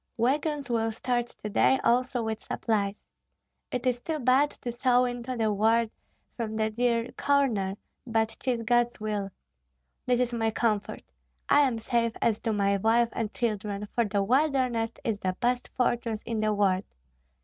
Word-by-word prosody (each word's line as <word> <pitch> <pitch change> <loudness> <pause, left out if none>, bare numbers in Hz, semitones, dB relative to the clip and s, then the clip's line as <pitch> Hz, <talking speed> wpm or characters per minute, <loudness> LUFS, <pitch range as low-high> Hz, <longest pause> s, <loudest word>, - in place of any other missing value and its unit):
Wagons 285 +4 0
will 225 -2 0
start 240 +2 -1
to 210 - -9
day 265 +5 +3
also 250 0 +2
with 220 -1 -3
supplies. 205 -2 -2 0.7
It 250 0 -3
is 245 -1 +1
too 320 +3 -2
bad 265 +2 +3
to 245 - -6
go 250 -1 +5
into 245 +1 -4
the 220 -2 +1
world 225 +2 +2 0.4
from 220 -2 -3
the 220 0 0
dear 235 +1 0
corner, 235 -10 +1 0.3
but 225 -1 0
'tis 245 -3 -1
God's 240 +1 +2
will! 210 -2 -2 0.8
This 245 -1 +3
is 250 -1 0
my 225 -1 +1
comfort: 215 -2 -1 0.5
I 290 - +6
am 240 -3 -2
safe 230 0 0
as 220 -2 +1
to 225 - -1
my 200 -1 +2
wife 225 +3 +3
and 220 -2 -3
children, 210 -3 -2
for 235 - +2
the 200 -1 0
wilderness 255 -2 +1
is 220 -3 -1
the 185 -1 -2
best 245 +1 0
fortress 235 -3 0
in 230 -2 -3
the 215 0 +1
world. 195 -2 +1
230 Hz, 165 wpm, -28 LUFS, 215-245 Hz, 0.8 s, I